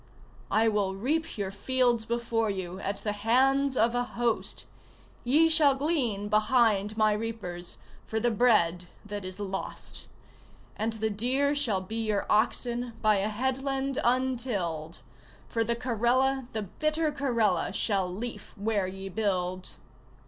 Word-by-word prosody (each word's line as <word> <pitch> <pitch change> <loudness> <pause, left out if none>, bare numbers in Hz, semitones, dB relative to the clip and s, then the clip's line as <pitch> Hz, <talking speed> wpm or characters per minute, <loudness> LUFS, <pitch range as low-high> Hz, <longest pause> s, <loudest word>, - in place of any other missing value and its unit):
I 225 +1 +3
will 205 -3 0
reap 290 +9 -1
your 195 -2 -2
fields 240 +2 +1
before 230 -1 0
you 185 -2 -4
at 200 0 -3
the 210 - 0
hands 260 +6 +2
of 230 +1 +3
a 245 - +1
host; 240 -2 -2 0.6
Ye 300 +7 +4
shall 310 -4 +5
glean 265 -9 0
behind 215 -1 +2
my 215 -1 +4
reapers, 210 -6 -4 0.3
for 220 - -1
the 240 +2 +1
bread 190 -7 +3 0.2
that 205 -1 -5
is 185 +1 -6
lost, 195 -1 -5 0.7
And 220 +1 -1
the 220 0 -1
deer 260 +7 +1
shall 240 -10 0
be 225 +4 -4
your 210 -2 0
oxen 240 +2 +1
By 215 -1 +4
a 200 +2 0
headland 265 +4 -1
untilled, 230 - -1 0.5
For 230 - 0
the 235 +1 0
Karela, 250 +2 +1
the 220 -1 -2
bitter 305 - -1
Karela, 255 -7 +1
Shall 195 -4 0
leaf 230 +4 -6
where 205 -2 0
ye 190 +1 -7
build! 185 -3 -2
225 Hz, 140 wpm, -28 LUFS, 200-255 Hz, 0.7 s, shall